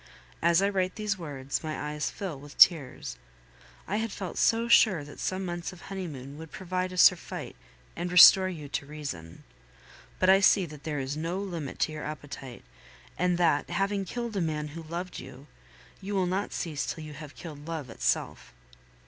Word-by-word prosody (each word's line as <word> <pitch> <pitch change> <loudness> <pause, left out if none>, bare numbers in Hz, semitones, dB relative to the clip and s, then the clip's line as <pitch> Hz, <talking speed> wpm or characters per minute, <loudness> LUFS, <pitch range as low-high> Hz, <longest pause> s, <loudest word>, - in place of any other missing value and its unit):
As 170 +3 +4
I 200 - +3
write 185 -2 -1
these 210 -2 -2
words, 140 -4 -4
my 155 -1 -4
eyes 150 0 -2
fill 180 -8 -6
with 145 +1 -13
tears. 155 -8 +4 0.7
I 205 - -1
had 225 0 -2
felt 190 -2 -5
so 230 +1 +3
sure 205 -8 +5
that 145 0 -12
some 190 0 -2
months 175 0 -4
of 185 - -13
honeymoon 145 -7 -6
would 160 -1 -10
prove 185 -1 -9
a 185 0 -1
surfeit 180 -1 +3 0.4
and 175 +1 -3
restore 185 +1 +9
you 155 -5 -7
to 140 0 -4
reason. 140 - -7 0.7
But 185 - +2
I 190 +1 +7
see 195 -1 +5
that 150 -3 -12
there 150 -2 -2
is 135 +2 -3
no 165 +4 -2
limit 175 -8 -5
to - - +2
your 155 -1 -6
appetite, 140 -4 -7 0.5
and 180 +1 +1
that, 165 -4 +2
having 195 +3 0
killed 235 +3 -5
a 195 - 0
man 150 -2 -2
who 165 +3 -8
loved 170 +3 -5
you, 135 +1 -11 0.6
you 200 +1 -4
will 190 -1 +2
not 190 +3 -1
cease 155 -5 -3
till 160 - -4
you 155 -1 -8
have 150 -1 -10
killed 150 -3 -9
love 155 -7 -5
itself. - - -2
170 Hz, 185 wpm, -28 LUFS, 150-185 Hz, 0.7 s, restore